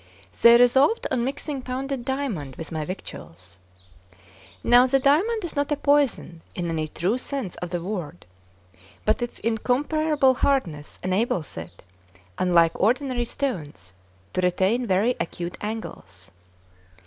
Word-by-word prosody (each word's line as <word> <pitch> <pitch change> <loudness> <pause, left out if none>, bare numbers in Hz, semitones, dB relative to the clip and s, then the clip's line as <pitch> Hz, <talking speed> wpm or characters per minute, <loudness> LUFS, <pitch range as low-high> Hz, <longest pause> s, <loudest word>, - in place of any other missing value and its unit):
They 235 0 +9
resolved 265 - +4
on 250 -3 +1
mixing 275 +2 -3
pounded 260 0 -4
diamond 240 - -3
with 165 - -7
my 160 -1 -2
victuals. 95 - -9 1.0
Now 245 +1 +6
the 270 +1 +3
diamond 350 - +2
is 335 - -5
not 285 +1 -1
a - - +3
poison 280 - +1
in 175 -1 -2
any 155 -1 -1
true 185 +10 -1
sense 260 -9 -4
of 175 - -5
the 175 -1 -3
word, 175 - -5 0.8
but - - +2
its 240 - -3
incomparable 270 +5 +1
hardness 185 - -1
enables 185 -3 -1
it, - - -9 0.6
unlike 170 -2 +3
ordinary 245 +2 +1
stones, 155 - -4 0.4
to 185 - 0
retain 190 +7 +1
very 200 +6 +2
acute 175 +1 -4
angles. 205 - -7
235 Hz, 130 wpm, -24 LUFS, 175-270 Hz, 1.0 s, They